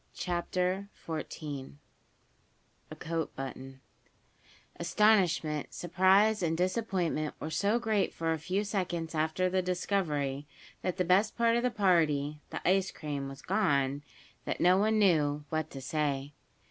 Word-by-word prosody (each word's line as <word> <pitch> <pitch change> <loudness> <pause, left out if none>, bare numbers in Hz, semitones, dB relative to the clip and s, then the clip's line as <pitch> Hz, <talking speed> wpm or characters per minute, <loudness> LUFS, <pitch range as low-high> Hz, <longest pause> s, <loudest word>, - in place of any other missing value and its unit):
CHAPTER 180 +2 -1 0.2
XIV 150 - -5 1.1
A - - -8
COAT 165 0 -3
BUTTON 135 0 -7 1.0
ASTONISHMENT, 175 -5 +2
surprise 190 +5 +3
and 165 -2 0
disappointment 180 -5 -1
were 155 - -5
so 200 +7 +2
great 220 -4 0
for 165 0 -2
a 160 - -3
few 185 +6 -1
seconds 180 -5 -2
after 160 +4 +1
the 185 +1 +1
discovery 155 -7 -1 0.3
that 185 0 -2
the 180 - +1
best 190 +5 +3
part 230 -1 +3
of 240 - +2
the 250 - +2
party 155 -9 +2
the - - -4
ice 190 +1 +3
cream 140 -3 -5
was 135 0 -11
gone, 145 -8 +1 0.4
that - - -3
no 180 +1 +5
one 215 +3 +2
knew, 150 -7 +2
what 155 -1 -2
to 135 - -8
say. 140 0 -2
175 Hz, 135 wpm, -30 LUFS, 150-195 Hz, 1.1 s, no